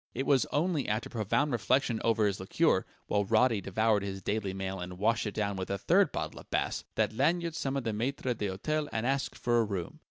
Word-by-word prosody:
It 135 +3 -1
was 140 -3 +3
only 160 -1 0
after 110 +2 -2
profound 120 +7 0
reflection 120 0 +1
over 115 -2 +3
his 100 -1 0
liqueur 95 - +2 0.2
(while 105 - +1
Roddy 110 +1 +3
devoured 105 +2 +2
his 95 -1 -5
Daily 100 -1 -1
Mail 95 0 -4
and 90 0 -6
washed 115 +3 +1
it 105 - -5
down 100 -2 -1
with 95 - -4
a 100 - -1
third 180 - +3
bottle - - -4
of - - -15
Bass) - - -1
that - - +1
Lanyard 165 +7 +1
summoned 135 -3 -2
the 110 - 0
maitre 125 +3 -1
d'hôtel 120 +10 -2
and 110 +1 -2
asked 135 +1 -1
for 120 -1 +2
a - - +4
room. 100 -5 -4
115 Hz, 215 wpm, -30 LUFS, 100-135 Hz, 0.2 s, a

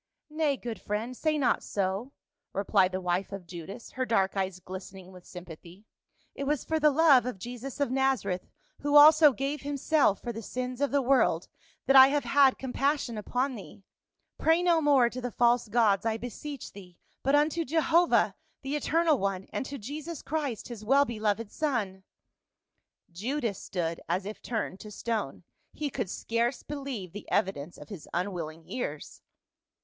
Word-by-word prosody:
" - - -59
Nay, 305 -3 +1
good 235 -3 -6
friend, 220 +5 -3
say 310 +3 0
not 270 -4 +2
so," 200 +6 -2 0.4
replied 195 -1 +2
the 185 - -2
wife 180 +2 -1
of 195 -2 -7
Judas, 180 +6 -9
her 260 - -2
dark 205 -6 +1
eyes 190 -1 -2
glistening 185 0 -9
with 180 -1 -14
sympathy. 175 +2 -11 0.2
" - - -41
It 280 - -5
was 295 -1 -1
for 320 0 0
the 305 0 +5
love 280 -4 +5
of 250 - -4
Jesus 245 +7 -7
of 285 -4 0
Nazareth, 260 -9 0 0.3
who 290 +1 0
also 305 0 +9
gave 275 +4 -3
himself 285 -6 +1
for 240 - -5
the 225 - -6
sins 250 +3 -5
of 285 - +2
the 280 -1 +1
world, 240 -10 +2 0.4
that 270 - +4
I 265 0 +11
have 290 +1 0
had 275 -2 +4
com 260 -2 -6
passion 275 -4 0
upon 250 +5 -1
thee. 200 -2 -11 0.6
Pray 325 +2 +3
no 340 -2 +3
more 280 -5 +5
to 250 +2 -6
the 250 - -3
false 240 0 +2
gods, 210 -3 +3
I 225 -1 0
beseech 245 +4 -7
thee, 180 -3 -13 0.2
but 275 +2 +2
unto 305 +3 +2
Jehovah, 330 +3 +3 0.3
the 275 +2 -2
eternal 315 -1 +2
One, 195 -1 -2
and 265 - -3
to 280 - -6
Jesus 295 +7 -7
Christ 290 -7 -3
his 230 -3 -8
well 275 +6 +4
beloved 215 -2 -2
son." 225 -11 -2 1.1
Judas 230 +3 -3
stood 170 -3 -3
as 185 +2 0
if 210 +1 -7
turned 215 -5 -3
to 215 - -9
stone. 210 -7 -3 0.3
He 295 -2 -3
could 190 - -3
scarce 235 +5 -1
believe 275 - -6
the 205 - -9
evidence 175 -3 -1
of - - -12
his 195 -8 -9
unwilling 170 -3 -3
ears. 155 - -5
240 Hz, 175 wpm, -29 LUFS, 195-280 Hz, 1.1 s, I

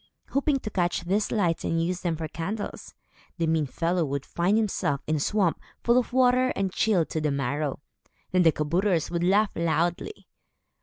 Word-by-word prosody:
Hoping 280 +1 +1
to 215 - -5
catch 175 -2 0
these 195 +5 0
lights 175 -6 0
and 165 - 0
use 175 +2 -1
them 170 -2 -1
for 160 0 -4
candles, 200 +7 -5 0.4
the 165 - 0
mean 160 -2 +1
fellow 170 +5 0
would 140 -2 -3
find 180 +5 +1
himself 190 -10 0
in 155 0 0
a - - -2
swamp, 185 0 +1 0.2
full 235 - +4
of 250 - -4
water 255 0 +4
and 195 -2 -1
chilled 195 -7 +2
to 155 - -2
the 150 - +1
marrow. 140 +1 -2 0.5
Then 185 - +3
the 165 -2 +6
kabouters 170 +3 0
would 170 0 -1
laugh 200 +4 +3
loudly. 170 - -1
175 Hz, 185 wpm, -26 LUFS, 160-205 Hz, 0.5 s, the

